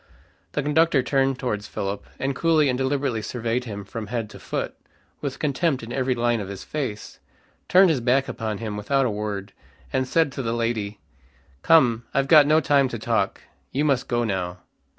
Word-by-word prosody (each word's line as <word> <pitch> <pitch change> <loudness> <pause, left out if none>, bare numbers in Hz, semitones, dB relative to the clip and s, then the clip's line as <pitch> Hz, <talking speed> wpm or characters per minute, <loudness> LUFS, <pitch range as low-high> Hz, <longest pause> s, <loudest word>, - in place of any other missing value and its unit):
The 150 - -1
conductor 150 -1 +3
turned 135 -1 +1
towards 105 -5 -3
Philip, 100 +1 -4
and 135 0 -2
coolly 155 -1 +3
and 125 - +1
deliberately 135 -3 0
surveyed 120 +2 -2
him 100 -3 -6
from 110 +1 -6
head 115 -2 -3
to - - -11
foot, - - -3 0.5
with 140 -3 -3
contempt 145 -2 0
in 115 - -6
every 130 -1 0
line 120 -1 +1
of 100 - -5
his 100 -1 -7
face, 130 -9 -5 0.5
turned 185 -1 +6
his 140 -6 0
back 130 +3 +2
upon 110 -3 -3
him 110 -2 -4
without 135 +6 +1
a 120 - 0
word, 105 -1 -4 0.4
and 130 - +1
said 160 0 +2
to 135 - -4
the 115 -2 -2
lady, 115 -3 -2 0.6
"Come, 120 - +4
I've 135 0 +2
got 150 -2 +7
no 155 +1 +5
time 140 -2 +3
to - - -4
talk. - - -1 0.3
You 145 +3 0
must 135 -4 +1
go 120 -1 +1
now." 90 -5 -2
125 Hz, 190 wpm, -24 LUFS, 110-140 Hz, 0.6 s, got